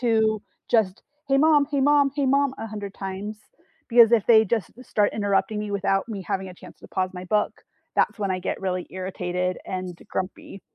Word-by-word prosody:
to 220 -3 +2 0.3
just, 210 -5 +2 0.3
“Hey, 275 - +4
mom. 300 -1 +5
Hey, 280 -2 +1
mom. 285 0 +4
Hey, 285 -2 0
mom,” 275 0 +2
100 205 -3 -6
times, 195 +2 -5 0.5
because 235 -1 +7
if 225 -4 +4
they 220 -2 +7
just 220 -3 -1
start 205 -1 +1
interrupting 205 +1 0
me 210 0 -4
without 195 +1 0
me 200 -3 -5
having 190 +1 -3
a 180 - -10
chance - - -14
to - - -14
pause 185 -1 -1
my 180 0 -7
book, 210 +3 +1 0.4
that's - - +2
when 200 -2 -1
I 185 - 0
get 185 - -3
really 185 -2 -2
irritated 180 -1 -3
and 185 -2 -4
grumpy. 190 +1 -5
205 Hz, 190 wpm, -24 LUFS, 185-235 Hz, 0.5 s, because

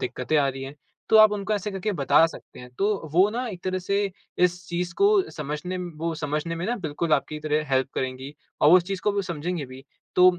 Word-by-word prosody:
दिक्क़तें 130 +5 -1
आ 140 -2 +3
रहीं 135 0 -5
हैं। 135 +2 -8 0.3
तो 220 - +6
आप 215 -1 +8
उनको 205 0 -2
ऐसे 205 +1 -3
करके 195 +2 -2
बता 145 0 +4
सकते 165 - -12
हैं। 125 - -10
तो 200 -5 0
वो 185 +4 +5
ना 245 +3 -3
एक 185 -4 -8
तरह 185 0 -1
से 200 +2 0 0.3
इस 180 0 0
चीज़ 175 0 -2
को 400 - +6 0.2
समझने 150 +4 -4
म 180 -1 -5
वो 165 0 -2
समझने 155 +2 -3
में 170 - -4
ना 240 - 0
बिल्कुल 160 -3 -3
आपकी 140 +2 +1
तरह 150 0 0
हेल्प 130 0 +2
करेंगी। 130 +2 -4 0.3
और 150 - +6
वो 180 - +9
उस 180 - +3
चीज़ 195 0 -4
को 200 -1 +1
समझेंगे 170 -3 -4
भी। 130 +1 -12 0.3
तो 180 0 +6
170 Hz, 230 wpm, -25 LUFS, 150-195 Hz, 0.3 s, वो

